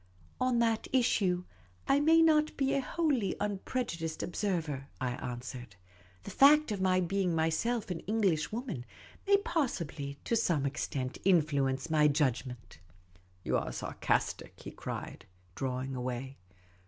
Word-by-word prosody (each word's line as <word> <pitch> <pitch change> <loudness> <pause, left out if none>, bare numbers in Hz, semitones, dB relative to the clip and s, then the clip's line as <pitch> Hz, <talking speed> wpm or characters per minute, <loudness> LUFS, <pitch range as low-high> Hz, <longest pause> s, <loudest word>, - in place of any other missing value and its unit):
" 85 - -24
On 255 -1 +2
that 230 -1 +1
issue, 200 -8 +2 0.4
I 275 - +4
may 325 +2 +5
not 310 -1 +3
be 270 -1 +1
a 275 - +2
wholly 265 - 0
unprejudiced 195 -5 -3
ob 175 - -6
server," 160 -9 -2
I 130 -1 -1
answered. 125 -3 -6 0.2
" 90 +1 -28
The - - -7
fact 300 -1 +6
of 200 -2 -2
my 185 -1 +3
being 185 -1 0
myself 185 +8 0
an 170 - -3
Englishwoman 200 - -1 0.4
may 400 0 +6
possibly 170 - -2
to 235 - 0
some 165 -10 +1
extent 135 -2 -3
influence 150 -5 +2
my 150 -1 +5
j 145 +1 +3
udgment. 125 - -5
' 90 +2 -29
' 90 0 -28
" 90 0 -33
You - - +2
are - - -3
sarcastic," - - -2
he - - -8
cried, - - -7 0.3
drawing 130 +3 -3
away. 130 +2 -4
165 Hz, 155 wpm, -31 LUFS, -, 0.4 s, fact